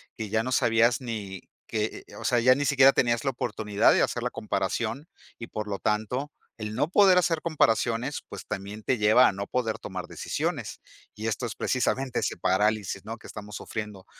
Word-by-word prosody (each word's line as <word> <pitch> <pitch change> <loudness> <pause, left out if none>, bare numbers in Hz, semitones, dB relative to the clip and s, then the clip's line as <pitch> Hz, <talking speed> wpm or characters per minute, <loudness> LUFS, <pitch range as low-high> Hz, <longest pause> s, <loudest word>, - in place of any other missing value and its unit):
que 110 -2 -5
ya 110 +1 +1
no 130 0 -2
sabías 120 +1 +3
ni 105 -6 -5 0.3
que 110 -1 -3
eh - - -14
o - - -9
o - - -7
sea, 120 -1 +2
ya 130 +2 +5
ni 145 - -1
siquiera 135 0 +6
tenías 120 +1 +1
la 135 - +2
oportunidad 105 -4 +1
de - - +3
hacer - - 0
la - - 0
comparación 150 +7 -2 0.3
y, 115 - -7
por 105 -2 -5
lo 100 -1 -3
tanto, 125 +7 -1 0.3
el 105 0 -5
no 145 - +1
poder 190 0 +5
hacer 165 -3 +2
comparaciones, 125 -4 +1
pues, - - -8
también 105 +1 -6
te 125 +1 0
lleva 110 +4 +6
a - - +2
no 100 +1 -5
poder 115 -3 -1
tomar 95 -2 -6
decisiones. - - -3 0.4
Y 110 - -6
esto 110 +3 -2
es 115 - -7
precisamente 130 0 0
ese - - -2
parálisis, 105 +1 0
¿no? - - -6
que - - -18
estamos 105 -1 -9
sufriendo. 105 -3 -6
115 Hz, 205 wpm, -27 LUFS, 105-130 Hz, 0.4 s, siquiera